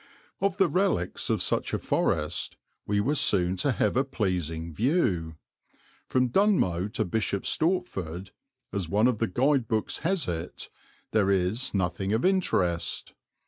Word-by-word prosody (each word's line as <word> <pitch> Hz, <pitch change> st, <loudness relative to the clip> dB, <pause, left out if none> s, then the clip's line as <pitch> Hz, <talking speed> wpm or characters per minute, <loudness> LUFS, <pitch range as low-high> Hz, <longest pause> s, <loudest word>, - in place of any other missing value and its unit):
Of 200 Hz, 0 st, 0 dB
the 195 Hz, -2 st, +4 dB
relics 180 Hz, -, 0 dB
of -, -, +1 dB
such -, -, 0 dB
a -, -, +1 dB
forest -, -, 0 dB, 0.3 s
we 105 Hz, 0 st, +1 dB
were 130 Hz, +8 st, +1 dB
soon 90 Hz, -10 st, +3 dB
to 135 Hz, +8 st, +1 dB
have 105 Hz, -2 st, 0 dB
a 135 Hz, -, +3 dB
pleasing 85 Hz, -, -2 dB
view. 95 Hz, -, 0 dB, 0.7 s
From 130 Hz, -1 st, +2 dB
Dunmow 120 Hz, -, +2 dB
to 110 Hz, -, 0 dB
Bishop 100 Hz, 0 st, -1 dB
Stortford, 95 Hz, -, -1 dB, 0.4 s
as 95 Hz, -5 st, -2 dB
one 105 Hz, +5 st, +3 dB
of 125 Hz, -4 st, +2 dB
the 115 Hz, -, +1 dB
guide 130 Hz, +4 st, +1 dB
books 110 Hz, -2 st, -1 dB
has 180 Hz, +1 st, 0 dB
it, 80 Hz, -2 st, -5 dB, 0.4 s
there 105 Hz, -3 st, +2 dB
is 100 Hz, +6 st, 0 dB
nothing 95 Hz, +1 st, -1 dB
of 110 Hz, -, +1 dB
interest. 95 Hz, -, 0 dB
105 Hz, 145 wpm, -27 LUFS, 90-140 Hz, 0.7 s, the